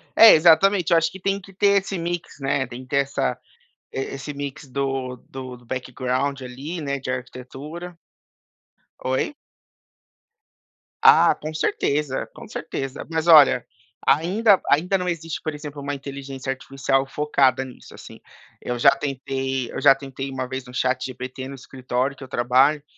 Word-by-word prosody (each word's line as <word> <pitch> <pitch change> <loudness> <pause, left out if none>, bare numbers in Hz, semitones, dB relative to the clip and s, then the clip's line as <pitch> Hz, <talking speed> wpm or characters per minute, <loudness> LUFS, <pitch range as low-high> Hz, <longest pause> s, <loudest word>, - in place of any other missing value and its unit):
É, 225 - +10
exatamente, 175 +3 +5
eu 170 - +6
acho 165 0 +2
que 190 - -10
tem 195 +1 0
que 195 0 -15
ter 200 +1 +3
esse 195 0 -5
mix, 170 -4 -4
né. 135 -1 0
Tem 125 +1 -8
que 130 - -16
ter 140 - +1
essa 140 0 0 0.6
e - - -3 0.2
esse 135 +2 -6 0.4
do 135 -1 -2
do 130 -1 -7
do 120 - -20
background 130 +2 -2
ali, 135 +7 -6
né, 140 -2 -2
de 130 - -7
arquitetura. 135 +7 -7 1.0
Oi? 130 - -1 1.7
Ah, - - +7
com 155 - -7
certeza, 145 -3 -1
com - - -10
certeza. 135 +1 -5
Mas 160 -1 -1
olha, 150 -7 +7 0.4
ainda 190 +7 +4
ainda 180 +7 +3
não 180 - -2
existe, 165 -2 -4
por 155 - -3
exemplo, 145 -1 -8
uma 145 +1 -3
inteligência 135 -1 -6
artificial 135 0 -1
focada 135 -2 +2
nisso, 130 - -13
assim. - - -12 0.4
Eu 125 - -3
já 120 - +6
tentei 135 -2 -3
eu - - -5
já 135 - +7
tentei 135 0 -6
uma 130 -1 -4
vez 130 0 -5
no 125 - -12
ChatGPT, 130 0 -3
no 135 - -7
escritório 130 0 -3
que 140 - -11
eu - - -9
trabalho, 130 +5 +3
135 Hz, 155 wpm, -23 LUFS, 130-155 Hz, 1.7 s, É